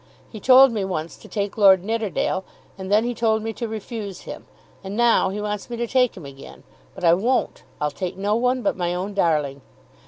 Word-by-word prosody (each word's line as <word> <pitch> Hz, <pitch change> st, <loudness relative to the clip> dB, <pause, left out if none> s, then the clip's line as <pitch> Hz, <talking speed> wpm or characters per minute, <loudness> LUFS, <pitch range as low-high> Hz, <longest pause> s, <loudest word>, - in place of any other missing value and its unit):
He 220 Hz, -, -8 dB
told 260 Hz, +3 st, +7 dB
me 215 Hz, -4 st, -2 dB
once 170 Hz, -4 st, -4 dB
to -, -, -15 dB
take 205 Hz, 0 st, -4 dB
Lord 190 Hz, -3 st, +6 dB
Nidderdale, 210 Hz, -3 st, -1 dB, 0.3 s
and 190 Hz, 0 st, -7 dB
then 210 Hz, +2 st, +4 dB
he 245 Hz, +1 st, -2 dB
told 220 Hz, -2 st, 0 dB
me 225 Hz, 0 st, -3 dB
to 235 Hz, +1 st, -4 dB
refuse 215 Hz, -3 st, -6 dB
him. -, -, -9 dB, 0.4 s
And 195 Hz, +2 st, -6 dB
now 235 Hz, -5 st, +3 dB
he 200 Hz, +2 st, -4 dB
wants 210 Hz, +1 st, -4 dB
me 240 Hz, -, -5 dB
to 235 Hz, -, -1 dB
take 250 Hz, -2 st, +1 dB
him 170 Hz, -, -9 dB
again. 135 Hz, 0 st, -12 dB, 0.3 s
But 185 Hz, -, -10 dB
I 165 Hz, -1 st, +6 dB
won't. 235 Hz, +9 st, 0 dB, 0.2 s
I'll 150 Hz, 0 st, -1 dB
take 185 Hz, +2 st, -5 dB
no 205 Hz, +2 st, 0 dB
one 250 Hz, +2 st, 0 dB
but 295 Hz, -, +1 dB
my 175 Hz, -1 st, -2 dB
own 190 Hz, +3 st, -4 dB
darling. 150 Hz, -7 st, 0 dB
205 Hz, 215 wpm, -22 LUFS, 185-230 Hz, 0.4 s, told